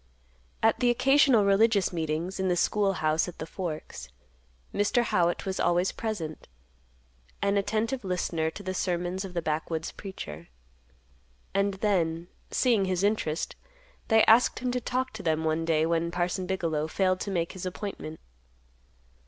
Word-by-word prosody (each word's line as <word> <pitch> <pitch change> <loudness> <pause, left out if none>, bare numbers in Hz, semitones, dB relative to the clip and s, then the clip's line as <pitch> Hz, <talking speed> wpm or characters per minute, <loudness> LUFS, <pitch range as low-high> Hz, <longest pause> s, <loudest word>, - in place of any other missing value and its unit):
At 225 0 +4
the 245 - +3
occasional 265 -2 +4
religious 200 -1 +3
meetings 165 +3 -2
in 190 - +1
the 180 - +2
school 200 +3 +2
house 155 -1 +1
at 180 - -8
the 155 - -5
Forks, 155 - -6 0.6
Mr. 205 +4 +2
Howitt 175 -5 +1
was 190 -1 -3
always 175 +2 +2
present, 190 -9 -5 0.9
an 200 0 +1
attentive 220 +5 0
listener 175 -3 -1
to 200 - -10
the 185 - -3
sermons 180 0 -1
of 185 -2 -8
the 170 - -1
backwoods 160 +1 -2
preacher. 190 - -8 1.1
And 200 0 +1
then, 175 -4 0 0.2
seeing 230 -6 +2
his 185 0 -1
interest, 200 -7 0 0.5
they 220 -1 +5
asked 230 +3 +5
him 250 0 -1
to 250 0 -1
talk 255 +2 -2
to 220 - -7
them 160 -2 0
one 160 +1 0
day 160 -1 +2
when 170 0 0
Parson 180 +1 -1
Bigelow 165 -5 -1
failed 185 +2 +1
to - - -4
make 170 -3 -1
his 185 -1 -6
appointment. 180 -4 -6
185 Hz, 155 wpm, -28 LUFS, 165-205 Hz, 1.1 s, they